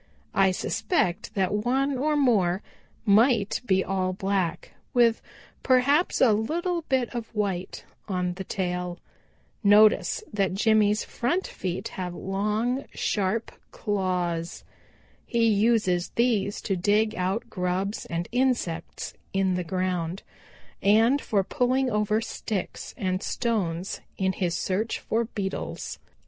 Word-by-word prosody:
I 195 -1 +4
suspect 185 - -1
that 190 -1 +1
one 265 +6 +1
or 300 +4 +1
more 200 -9 +2 0.4
might 215 0 +4
be 190 -2 +3
all 185 -1 -1
black, 190 -3 -1 0.2
with 235 -2 +4 0.4
perhaps 275 +6 +3
a 235 -5 +6
little 335 - -1
bit 260 -3 +1
of 235 -2 -4
white 195 -4 -2 0.2
on 180 -3 -1
the 190 +2 -6
tail. 180 -2 -3 0.7
Notice 210 - +5
that 195 -2 0
Jimmy's 215 0 +3
front 345 +11 -1
feet 180 -1 -4
have 180 -2 -5
long, 215 +8 -1
sharp 210 +3 -1 0.2
claws. 180 -5 -2 0.6
He 235 -1 +1
uses 210 -5 +2
these 225 -4 +1
to 195 - -1
dig 210 +4 +2
out 195 +5 -2
grubs 185 +2 -2
and 170 0 -3
insects 240 -10 -1 0.2
in 195 -1 +2
the 180 0 -1
ground, 180 0 -2 0.6
and 225 +7 +4
for 200 -3 +1
pulling 255 +3 +1
over 210 +1 +1
sticks 210 -4 -4
and 185 -1 -1
stones 195 -8 -2 0.2
in 190 -1 +1
his 175 -3 -1
search 210 +4 -1
for 230 +1 -1
beetles. 200 -4 -4
205 Hz, 120 wpm, -26 LUFS, 185-235 Hz, 0.7 s, a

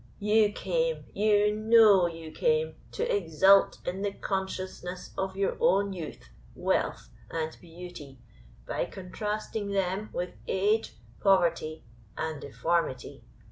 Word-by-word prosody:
You 210 0 +3
came - - -1
you 210 0 +3
know 215 -4 +6
you 165 -1 -8
came, 475 - +1 0.2
to - - -2
exult 195 - +4
in 185 +2 -3
the 205 0 0
consciousness 185 -2 -4
of 190 0 -3
your 195 0 0
own 200 +1 +3
youth, 155 - -8 0.2
wealth, - - -1 0.2
and 160 -1 -3
beauty, 165 -5 -10 0.5
by - - -2
contrasting 210 +2 -4
them 195 +2 -1
with 180 0 -3
age, 210 +4 +1 0.2
poverty, 170 -5 +2 0.3
and 160 -2 -3
deformity. 160 -4 -2
190 Hz, 115 wpm, -28 LUFS, 175-210 Hz, 0.5 s, know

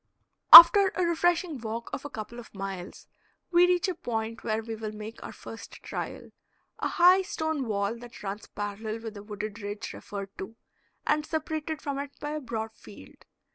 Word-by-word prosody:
After 385 +4 +12
a 365 - 0
refreshing 340 -2 0
walk 230 +1 -6
of 275 - -5
a - - -5
couple 230 +1 -8
of 230 - -14
miles 195 -2 -7 0.5
we 350 0 +5
reach 360 0 +1
a 370 - -1
point 230 -6 -5
where 220 0 -2
we 225 0 -6
will 220 -1 -6
make 215 +2 -9
our - - -8
first 225 - -11
trial - - -7 0.5
a - - -1
high 360 +2 +5
stone 315 -7 -3
wall 200 +1 -1
that 240 -2 -12
runs 200 +1 -6
parallel 215 +2 -6
with 225 -2 -7
the 205 - -10
wooded 210 +1 -7
ridge 205 0 -6
referred 200 -1 -8
to, 195 +4 -7 0.5
and 300 0 +1
separated 315 -1 -4
from 280 -2 -3
it 285 0 -8
by 295 0 -5
a 305 - -3
broad 225 -3 -5
field. - - -16
230 Hz, 180 wpm, -27 LUFS, 215-315 Hz, 0.5 s, After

